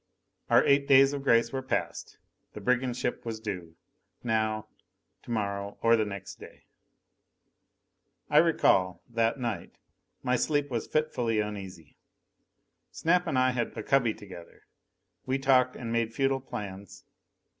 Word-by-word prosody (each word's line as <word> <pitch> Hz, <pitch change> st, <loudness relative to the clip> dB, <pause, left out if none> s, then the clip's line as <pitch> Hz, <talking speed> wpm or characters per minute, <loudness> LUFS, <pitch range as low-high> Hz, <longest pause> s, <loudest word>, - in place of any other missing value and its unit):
Our -, -, +5 dB
eight 140 Hz, 0 st, +3 dB
days 135 Hz, 0 st, +6 dB
of 140 Hz, -, -3 dB
grace 115 Hz, -3 st, +3 dB
were 135 Hz, -, -2 dB
passed. 130 Hz, -, -3 dB, 0.4 s
The -, -, -7 dB
brigand 125 Hz, 0 st, 0 dB
ship 120 Hz, -, -2 dB
was 115 Hz, -2 st, -5 dB
due 90 Hz, -7 st, -6 dB, 0.5 s
now, 110 Hz, -2 st, 0 dB, 0.6 s
tomorrow, 100 Hz, -3 st, -3 dB
or 115 Hz, 0 st, +6 dB
the 110 Hz, -1 st, +1 dB
next 100 Hz, -2 st, -8 dB
day. -, -, -13 dB, 1.6 s
I 150 Hz, -, +5 dB
recall, 95 Hz, -, +2 dB
that 115 Hz, +2 st, 0 dB
night, 115 Hz, -4 st, -4 dB, 0.5 s
my 125 Hz, 0 st, +2 dB
sleep 145 Hz, +1 st, 0 dB
was 115 Hz, -2 st, -2 dB
fitfully 125 Hz, -8 st, 0 dB
uneasy. 95 Hz, -7 st, -6 dB, 0.9 s
Snap 180 Hz, +2 st, +1 dB
and 135 Hz, -, 0 dB
I 130 Hz, 0 st, +3 dB
had 120 Hz, -1 st, -3 dB
a 110 Hz, -, -4 dB
cubby 125 Hz, -4 st, +2 dB
together. 90 Hz, -4 st, -13 dB, 0.6 s
We 130 Hz, +1 st, +1 dB
talked, 130 Hz, -2 st, +3 dB
and 115 Hz, -2 st, -5 dB
made 115 Hz, -1 st, -1 dB
futile 135 Hz, -1 st, +1 dB
plans. 100 Hz, -6 st, -8 dB
115 Hz, 135 wpm, -28 LUFS, 105-135 Hz, 1.6 s, days